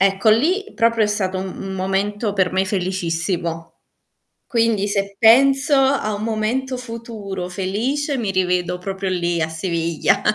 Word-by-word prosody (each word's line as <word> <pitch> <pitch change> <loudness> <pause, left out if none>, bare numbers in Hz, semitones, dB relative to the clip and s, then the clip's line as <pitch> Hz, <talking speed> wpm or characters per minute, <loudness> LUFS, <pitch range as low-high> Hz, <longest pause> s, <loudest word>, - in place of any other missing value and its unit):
Ecco, 195 +2 +3
lì, 320 - +3
proprio 230 -1 +3
è - - +1
stato 190 -3 -1
un 190 - -3
un 195 0 -6
momento 200 +3 -1
per 190 -2 +1
me 190 +1 +1
felicissimo, 170 -3 -2 0.7
quindi 225 -4 +1
se 200 0 -2
penso 270 +6 +5
a 265 -5 +2
un 205 - -5
momento 235 +4 -1
futuro 225 -6 -6
felice 240 - -2
mi 215 -4 -1
rivedo 180 -1 0
proprio 190 +1 -4
lì, 175 -2 0
a 160 - 0
Siviglia. 170 +3 0
200 Hz, 145 wpm, -20 LUFS, 185-230 Hz, 0.7 s, penso